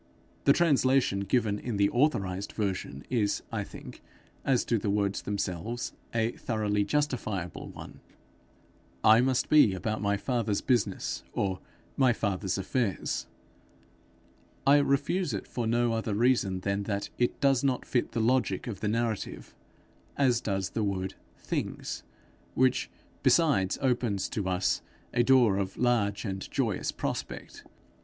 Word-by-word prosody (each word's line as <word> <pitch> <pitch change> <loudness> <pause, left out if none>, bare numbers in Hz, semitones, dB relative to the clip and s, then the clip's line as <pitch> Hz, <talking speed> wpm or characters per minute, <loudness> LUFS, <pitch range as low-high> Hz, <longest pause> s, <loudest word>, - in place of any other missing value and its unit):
The 140 - +7
translation 135 - +3
given 105 +1 +1
in 120 -4 -3
the 100 0 +3
authorized 100 -9 0
version 95 -9 -3
is, 110 -5 +1
I - - -2
think, - - -11 0.4
as 130 -3 +2
to 115 - +1
the 100 - -2
words 100 -1 0
themselves, 105 +4 -3 0.2
a 115 0 +1
thoroughly 105 -4 -1
justifiable 115 - -2
one: - - -10 1.0
'I 110 +2 +7
must 130 0 +1
be 145 -11 +6
about 110 +4 -2
my 100 -1 +1
father's 110 -2 -1
business,' 120 -5 0
or 95 -2 -1 0.4
'my 130 -3 +5
father's 100 -3 -1
affairs'; 95 - -1 1.4
I 140 +1 +7
refuse 145 - +1
it 100 - -5
for 120 -2 -3
no 120 0 +2
other 110 -2 -1
reason 110 -5 +2
than 100 +1 -1
that 100 -1 -2
it 120 - +1
does 135 -2 +3
not 135 -2 0
fit 120 -2 -1
the 115 - -1
logic 125 +3 +1
of 115 -5 -5
the 105 - -2
narrative, 115 -1 -2 0.6
as 125 -4 +3
does 95 -2 -2
the 110 - -1
word 95 -2 -2 0.2
things, 65 0 -4 0.5
which 130 -1 +2 0.3
besides 140 - +3
opens 120 -7 0
to 100 -3 -2
us 90 +1 +1 0.3
a 120 - +3
door 120 -5 +5
of 95 -1 -3
large 110 -5 +1
and 95 -2 -4
joyous - - -1
prospect. - - -5
110 Hz, 140 wpm, -29 LUFS, 100-125 Hz, 1.4 s, The